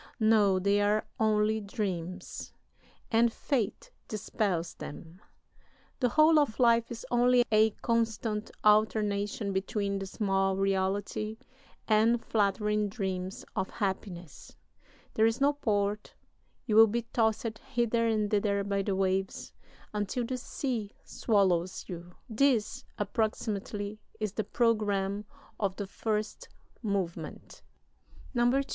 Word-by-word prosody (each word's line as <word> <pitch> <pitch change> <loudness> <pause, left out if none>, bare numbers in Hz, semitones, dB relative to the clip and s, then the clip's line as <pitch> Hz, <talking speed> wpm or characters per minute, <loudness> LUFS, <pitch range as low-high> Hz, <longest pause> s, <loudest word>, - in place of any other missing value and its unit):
No, 215 -3 +4
they 200 +2 +2
are 210 +1 +2
only 215 0 +2
dreams, 185 -4 -4 0.6
and 230 +1 +4
Fate 230 -4 -2 0.2
dispels 200 -5 -2
them. 165 +5 -10 0.8
The 250 -3 +2
whole 310 +4 +5
of 280 -7 0
life 235 -1 +4
is 235 -1 -7
only 245 0 +4
a 215 0 +5
constant 225 -2 0
alternation 210 -1 +2
between 200 +1 -1
dismal 195 -1 0
reality 195 +2 -1 0.5
and 225 +2 +4
flattering 210 -1 +1
dreams 190 -3 -4
of 190 - -1
happiness. 190 -5 -5 0.6
There 220 +1 +4
is 225 +3 -1
no 285 +1 +4
port: 210 -6 -1 0.5
you 220 -4 0
will 225 +1 +9
be 235 +2 -1
tossed 220 -1 0
hither 235 -2 0
and 215 -2 0
thither 200 -1 +1
by 200 0 0
the 195 0 -1
waves, 190 0 -1 0.4
until 210 +4 -1
the 255 +2 -3
sea 240 -4 -3
swallows 185 -5 +1
you. 175 0 -8
This, 235 -1 +1
approximately, 210 -1 -2 0.2
is 215 -2 -2
the 215 - -2
programme 205 -3 +1 0.3
of 195 -3 0
the 205 - -4
first 215 +2 -3 0.3
movement. 180 -7 -4 0.7
"[II. 245 +3 +3
210 Hz, 115 wpm, -30 LUFS, 195-225 Hz, 0.8 s, will